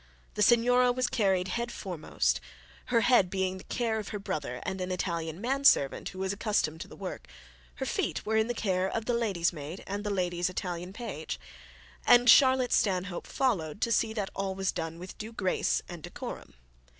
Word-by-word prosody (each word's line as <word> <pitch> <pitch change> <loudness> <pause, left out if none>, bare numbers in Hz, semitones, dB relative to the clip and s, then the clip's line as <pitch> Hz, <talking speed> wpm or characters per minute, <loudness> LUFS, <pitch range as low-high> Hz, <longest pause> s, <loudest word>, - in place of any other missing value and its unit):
The - - -3
signora 245 +3 +5
was 255 +1 0
carried 190 -6 +1
head 235 +4 -2
foremost, 180 -9 -1 0.4
her 235 -2 +2
head 240 -8 +4
being 190 0 -1
the - - -12
care 230 -3 -1
of 210 - -6
her 210 - -4
brother 150 -10 -4
and 190 0 -3
an 180 - -2
Italian 170 -2 -2
man 270 +5 -1
servant 140 - +4
who - - -11
was 190 +1 -1
accustomed 200 -7 0
to - - -6
the - - -12
work; - - -7 0.5
her - - -3
feet - - -2
were 220 - 0
in 220 0 +3
the 240 - -2
care 190 -3 0
of 225 +2 -3
the 245 - 0
lady's 200 -8 +1
maid 155 +4 -7
and 200 +1 -4
the 210 - -2
lady's 180 -2 0
Italian 180 -1 -4
page; 200 -8 -5 0.6
and 245 -1 +7
Charlotte 260 -2 +5
Stanhope 185 -2 0
followed 200 - 0
to 235 - +1
see 225 -1 +2
that 205 -3 -3
all 195 -1 -2
was 195 0 0
done 165 -2 -4
with 180 +2 -10
due 220 +1 -6
grace 190 -4 0
and 175 -2 -8
decorum. - - -8
195 Hz, 195 wpm, -29 LUFS, 180-230 Hz, 0.6 s, and